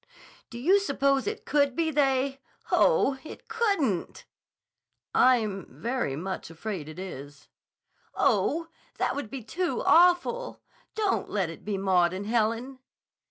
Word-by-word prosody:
"Do 235 - -8
you 360 +12 +4
suppose 275 -6 +1
it 425 0 -4
could 285 -3 +2
be 325 0 0
they? 270 -2 +1 0.3
Oh, 280 - +3
it 315 - -11
couldn't!" 400 - -1 0.9
"I'm 220 -6 +3
very 235 - -2
much 185 +4 -5
afraid 165 -2 -6
it 155 - -10
is." 145 -6 -9 0.7
"Oh, 280 - +1 0.3
that - - 0
would 285 -6 -4
be 260 0 -7
too 345 +11 -2
awful! 360 +9 +3 0.4
Don't 425 -3 0
let 190 -5 -1
it 165 - -12
be 205 -2 -2
Maud 185 -2 +2
and 190 +2 -5
Helen!" 230 +4 -1
255 Hz, 130 wpm, -27 LUFS, 195-315 Hz, 0.9 s, you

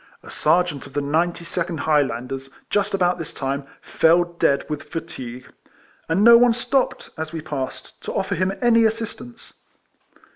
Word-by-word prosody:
A - - -11
Serjeant 160 -3 +1
of - - -16
the - - 0
92nd 170 +2 -1
High 150 -2 +3
landers, 135 0 -4 0.2
just 205 0 +1
about 180 -2 +1
this 165 - -5
time, 135 +1 -3 0.2
fell 165 +2 +4
dead 170 -5 0
with 150 -1 -4
fatigue, 130 -7 -7 0.6
and 175 +5 +2
no 235 +1 +9
one 245 -1 +5
stopped, 255 +3 -1
as 160 -1 -4
we 165 - -4
passed, 145 -4 -6
to - - -3
offer 195 +1 -1
him 185 +1 0
any 230 -1 +5
assistance. 230 +2 -4
170 Hz, 155 wpm, -22 LUFS, 145-200 Hz, 0.6 s, no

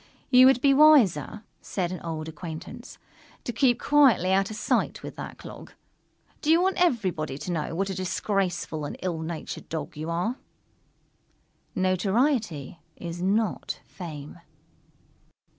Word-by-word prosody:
"You 255 0 +8
would 265 -2 +4
be 275 0 +5
wiser," 245 - +5 0.2
said 180 -3 -3
an 185 - -5
old 160 -2 -5
acquaintance, 160 0 -8 0.5
"to 240 - -4
keep 245 +1 +3
quietly 265 -11 +4
out 195 0 +2
of 215 - -6
sight - - 0
with - - -7
that - - -7
clog. - - -11 0.7
Do 300 - -2
you 325 +1 +6
want 375 0 +1
everybody 185 - 0
to 180 - -5
know 165 -1 -2
what 195 +2 -1
a - - -2
disgraceful 185 -3 -2
and 145 - -5
ill 175 -3 -2
natured 160 0 -6
Dog 160 -3 -5
you 155 +2 -5
are?" 180 +10 -1 1.4
_Notoriety 190 - 0 0.2
is 170 0 -6
not 205 +2 0
fame. 150 -5 -9
185 Hz, 140 wpm, -26 LUFS, 165-240 Hz, 1.4 s, You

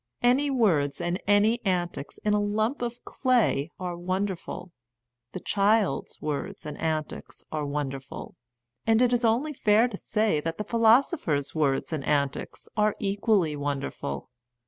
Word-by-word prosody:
Any 260 +4 +4
words 165 - +2
and 175 +2 -2
any 210 +3 +3
antics 175 -6 -2
in 210 - +3
a 210 - +3
lump 215 +6 0
of 240 0 -4
clay 240 - +1
are 180 -1 -3
wonderful, 185 0 -3 0.6
the - - -4
child's 205 +2 +1
words 150 -1 -4
and 150 -1 -5
antics 155 -1 -3
are 150 -2 -2
wonder 140 -2 -2
ful, 135 - -10 0.5
and 225 0 +5
it 250 0 +4
is 240 0 +1
only 240 +7 +2
fair 220 -1 +4
to 220 -5 -6
say 215 -7 +1
that 165 +2 -3
the 210 - -2
philosopher's 225 - +3
words 145 0 0
and 150 -3 -2
antics 140 -1 -1
are 210 -1 +2
equally 200 -5 +1
wonderful. 140 - -4
195 Hz, 145 wpm, -27 LUFS, 150-225 Hz, 0.6 s, and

